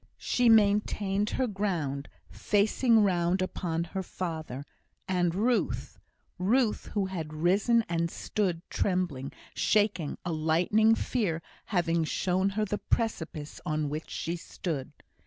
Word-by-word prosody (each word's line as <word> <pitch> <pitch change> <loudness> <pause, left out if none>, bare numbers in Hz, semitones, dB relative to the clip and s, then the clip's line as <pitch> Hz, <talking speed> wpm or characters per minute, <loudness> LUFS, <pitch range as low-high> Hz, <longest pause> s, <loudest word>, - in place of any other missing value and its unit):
She 245 -1 +2
maintained 205 -1 +3
her 260 - 0
ground, 175 - -2 0.2
facing 220 +2 +3
round 180 -1 +2
upon 170 -3 -1
her 180 +3 -4
father, 160 -7 -5 0.4
and 175 -2 +1
Ruth 235 +4 0 0.4
Ruth, 225 +4 +2
who 200 -2 +2
had 165 -5 -5
risen, 200 +8 +3
and 170 0 0
stood 180 -2 -2
trembling, 175 -9 -1 0.2
shaking, 205 -8 +1
a 175 - -1
lightning 175 +8 +3
fear 185 -10 -1 0.2
having 170 -4 +1
shown 185 +4 +1
her 215 - +2
the 205 +1 -2
precipice 160 -9 -2
on 155 -3 -1
which 155 +2 -5
she 170 - -3
stood. 155 -5 -5
180 Hz, 120 wpm, -29 LUFS, 165-210 Hz, 0.4 s, maintained